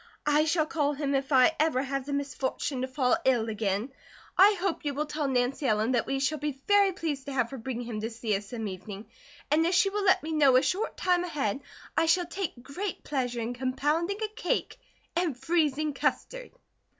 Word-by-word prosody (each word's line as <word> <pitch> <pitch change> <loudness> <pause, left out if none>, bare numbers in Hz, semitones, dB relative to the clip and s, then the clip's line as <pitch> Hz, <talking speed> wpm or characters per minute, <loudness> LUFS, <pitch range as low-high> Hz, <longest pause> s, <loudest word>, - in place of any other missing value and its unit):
I 300 +1 +3
shall 315 0 +2
call 295 -2 0
him 280 -1 -2
if 270 +1 -1
I 265 +4 +5
ever 300 -4 +2
have 275 0 -3
the 285 - -3
misfortune 275 -1 -2
to 260 - -1
fall 260 -1 +1
ill 240 -4 +2
again. 210 +3 -1 0.4
I 405 +2 +6
hope 365 -2 -1
you 290 -2 -2
will 300 +2 -1
tell 300 -1 -2
Nancy 260 +2 0
Ellen 215 +1 +2
that 240 -3 +1
we 270 - -1
shall 295 +3 0
be 290 -2 -3
very 405 -1 +5
pleased 310 -7 -4
to 280 - -4
have 250 -2 0
her 270 - -6
bring 245 +1 -4
him 230 -3 -5
to 225 - -2
see 225 -2 -2
us 200 0 -5
some 225 -3 -4
evening, 195 +2 -7 0.5
and 310 +2 +4
if 345 +2 +2
she 390 - +4
will 415 0 -1
let 375 -3 +4
me 320 - -4
know 285 -4 +5
a 255 - +5
short 370 +11 -1
time 360 -1 +2
ahead 275 - -2 0.4
I 330 - +2
shall 355 +2 +3
take 340 -8 -5
great 360 +8 -5
pleasure 250 -4 -2
in 230 +2 -3
compounding 295 +9 -1
a - - +1
cake 430 +3 -2 0.4
and 335 -7 0
freezing 305 -1 +1
custard." - - -2
280 Hz, 210 wpm, -28 LUFS, 250-330 Hz, 0.5 s, I